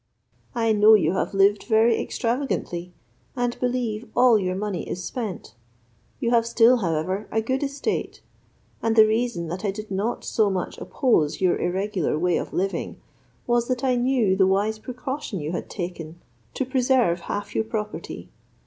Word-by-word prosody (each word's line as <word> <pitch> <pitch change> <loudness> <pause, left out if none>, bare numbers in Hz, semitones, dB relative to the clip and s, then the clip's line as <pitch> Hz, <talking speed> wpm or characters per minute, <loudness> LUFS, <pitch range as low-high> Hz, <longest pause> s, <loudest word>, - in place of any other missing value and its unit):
I 225 -2 +2
know 215 +1 +7
you 200 - +2
have 195 - -2
lived 200 +1 +3
very 225 0 +3
extravagantly, 230 -8 -2 0.4
and 245 -1 -1
believe 245 -3 -2
all 245 -3 +5
your 185 -1 -1
money 200 -2 -3
is 180 - -4
spent; 220 -5 -5 0.7
you 235 - 0
have 235 -1 +4
still, 235 +1 +4
however, 185 +1 -2
a 220 - +1
good 260 +4 -1
estate; 280 0 -3 0.6
and 225 -1 +1
the 220 -1 +8
reason 220 -5 -1
that 180 +4 -5
I 205 - 0
did 210 +1 -6
not 205 +5 -2
so 215 -2 +2
much 185 -2 -3
oppose 165 - +1
your 185 -2 +2
irregular 185 -2 -1
way 175 +1 +1
of - - -4
living 195 +2 -2 0.5
was, 240 -1 +1
that 250 -1 -2
I 260 -1 +3
knew 245 -5 +2
the 190 -1 +4
wise 205 +3 +1
precaution 255 -2 -5
you 150 +1 -4
had 175 - -4
taken 175 -3 -6 0.4
to 265 - -1
preserve 250 -8 +2
half 205 - -3
your - - +1
property. 215 -1 -5
215 Hz, 165 wpm, -24 LUFS, 190-240 Hz, 0.7 s, the